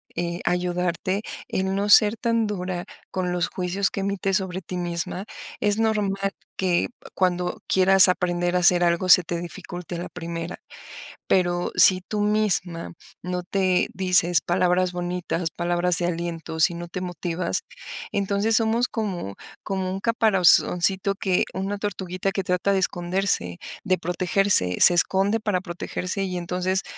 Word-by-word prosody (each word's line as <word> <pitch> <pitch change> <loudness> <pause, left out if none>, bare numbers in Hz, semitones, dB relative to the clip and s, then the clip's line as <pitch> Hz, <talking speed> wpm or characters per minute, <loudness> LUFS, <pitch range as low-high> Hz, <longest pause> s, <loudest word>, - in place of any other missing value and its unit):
eh, 170 0 -3
ayudarte 180 +2 -1 0.3
en 190 0 -1
no 200 +1 -1
ser 210 +1 +6
tan 230 -2 0
dura 180 -3 -4 0.3
con 180 -1 -2
los 175 -1 0
juicios 185 +2 -1
que - - -4
emites 195 0 0
sobre 190 -1 -4
ti 180 +1 -6
misma. 175 +2 -3 0.3
Es 205 0 +2
normal 200 -3 0 0.3
que, 180 -2 +1 0.3
cuando 180 -1 0
quieras 190 0 +5
aprender 175 0 0
a - - +3
hacer 175 0 +4
algo, 170 +2 +1
se 180 - +8
te 170 0 -3
dificulte 175 0 -7
a - - -4
la 175 - -6
primera. 170 0 -6 0.7
Pero 175 -1 +1
si 185 -1 +7
tú 210 -1 -2
misma 205 -6 0 0.3
no 180 0 -3
te 185 -1 +1
dices 180 -2 +3
palabras 180 +1 +1
bonitas, 175 -1 -3
palabras 175 0 0
de 175 - 0
aliento, 165 -2 -4
si 170 +1 +4
no 175 0 -7
te 180 +2 -6
motivas, 175 0 -3 0.5
entonces 200 +2 +1
somos 230 +2 +2
como 185 - -4 0.3
como 190 -1 -3
un 190 - -4
caparazoncito 195 -3 +3
que, 190 -2 +1
una 195 +2 -3
tortuguita 190 -2 -3
que 195 - -2
trata 180 +2 0
de 195 - +2
esconderse, 175 - -1 0.3
de 185 -2 +1
protegerse, 180 - +1
se 175 - +7
esconde 195 +5 +2
para 205 -4 0
protegerse 180 +2 -4
y 180 -1 -3
entonces 180 +2 -1
180 Hz, 150 wpm, -24 LUFS, 175-195 Hz, 0.7 s, se